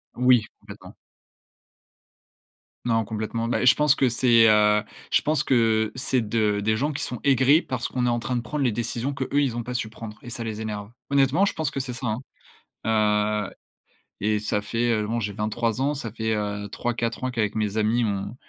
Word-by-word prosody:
oui, 125 -2 +4 0.2
complètement. - - -12 1.9
Non 115 -2 +1
complètement. 110 +1 -3
Bah 120 - 0
et - - +1
je 125 - +7
pense 150 -1 +4
que 135 -3 +2
c'est, 120 -1 +5
heu, 105 0 +4 0.3
je - - +3
pense 150 -1 +1
que, 110 -4 +2
c'est 130 0 +1
de 105 -1 0
des 110 +2 +1
gens 145 +7 0
qui 140 - -4
sont 125 - -4
aigris, 135 +3 +5
parce 130 -6 -3
qu'on 125 -1 -1
est - - +2
en 120 0 0
train 125 +2 -3
de 120 - 0
prendre 140 +5 -3
les 120 - +1
décisions 120 +4 -2
qu'eux 140 +1 0
ils 130 -5 0
ont 120 - -3
pas 125 - -5
su 120 -2 -2
prendre 110 -1 -9
et 120 - -10
ça 120 0 -5
les 110 -1 -5
énerve. 105 -1 -5 0.2
Honnêtement 140 +6 +3
je - - -1
pense 160 -3 -2
que - - -3
c'est 130 -2 -4
ça, 120 +1 -4
hein. 110 +1 -1 1.3
Heu. - - -17 0.7
Et 105 +1 +2
ça 105 0 -1
fait, 120 +3 -1
heu, 105 - -3
bon 115 +2 -1
j'ai 100 -1 -3
23 115 +3 -1
ans, 145 +2 +1
ça 130 -6 -5
fait, 110 0 -2
heu, 105 -1 -3
3-4 120 0 -2
ans 130 - 0
qu'avec 110 -4 -1
mes 105 -1 -1
amis 110 +3 +2
on 100 +1 -3
115 Hz, 210 wpm, -24 LUFS, 110-130 Hz, 1.9 s, je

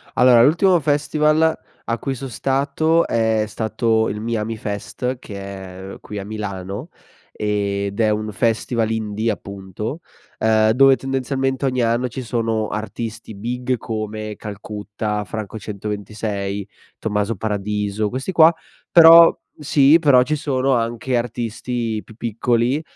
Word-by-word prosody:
Allora, 125 -2 +6
l'ultimo 175 +5 +4
festival 150 +2 +2 0.3
a 115 0 -2
cui 135 - -3
son 135 +1 -7
stato 140 +7 +1
è 110 -1 +1
stato 110 +1 0
il 105 - -4
Miamifest 115 +2 -3
che 100 -5 -9
è, 95 -1 -8
uhm, - - -10
qui 105 - -7
a 100 - -5
Milano 100 - -5 0.4
ed 100 -1 -2
è 110 -1 +3
un 110 0 -1
festival 115 +1 0
indie 110 0 -1
appunto, 100 - -6 0.4
ehm, 110 0 +3
dove 135 +2 +6
tendenzialmente 135 0 -2
ogni 130 -2 0
anno 120 +2 +1
ci 125 +2 -6
sono 115 -2 -1
artisti 110 +1 -5
big 125 +4 -2
come 110 -1 -5
Calcutta, 105 0 -5
Franco 110 +2 -6
126, 105 -1 -4 0.3
Tommaso 105 0 -1
Paradiso, 105 0 -2
questi 130 - -4
qua. 165 -1 +7 0.4
Però 165 0 +9 0.2
sì, 150 +1 +5
però 140 -6 +5
ci 155 - -1
sono 135 -2 0
anche 120 +1 0
artisti 120 -1 -3
più 110 - -15
piccoli, 120 +2 0
ehm, 155 - -4
115 Hz, 130 wpm, -20 LUFS, 105-130 Hz, 0.4 s, Però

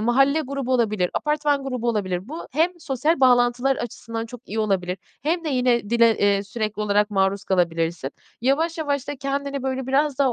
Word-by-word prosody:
mahalle 270 +7 +3
grubu 275 -3 -3
olabilir, 215 -7 +1
apartman 295 -2 +1
grubu 250 -3 -2
olabilir; 190 -3 -1
bu 320 +4 -6
hem 340 +4 +1
sosyal 280 +2 0
bağlantılar 245 +1 +4
açısından 230 -1 -5
çok 245 +1 -10
iyi 220 +3 -4
olabilir 190 -3 0 0.2
hem 330 +3 0
de - - -1
yine 250 -5 +1
dile, 235 -1 +4
eee, 200 -1 +3
sürekli 215 0 -3
olarak 210 0 +2
maruz 195 0 +1
kalabilirsin. 165 -5 0 0.3
Yavaş 315 +7 +1
yavaş 285 -3 -2
da 290 - -3
kendini, 275 0 -3
böyle, 265 -1 -2
biraz 280 +1 +1
daha 265 -3 +3
245 Hz, 175 wpm, -23 LUFS, 210-280 Hz, 0.3 s, bağlantılar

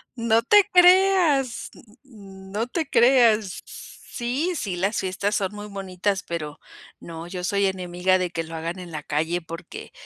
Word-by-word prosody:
No 230 -1 +2
te 410 - +5
creas, 360 -8 +4 0.3
n 195 -6 -14
no 220 +4 -2
te 315 +3 -3
creas. 230 -6 +3 0.5
Sí, 265 +9 -2
sí, 200 - -3
las 195 +4 -1
fiestas 190 +2 -2
son 195 0 -2
muy 205 0 -8
bonitas, 195 0 -3
pero 155 -5 -6 0.4
no, 165 0 -9
yo 180 0 -6
soy 200 +1 +1
enemiga 185 0 0
de 180 -1 -2
que 165 - -3
lo 165 0 -11
hagan 165 +3 -5
en 180 -2 -9
la 155 -2 -5
calle, 160 +5 -1
porque, 165 +1 -9
195 Hz, 160 wpm, -23 LUFS, 180-240 Hz, 0.5 s, te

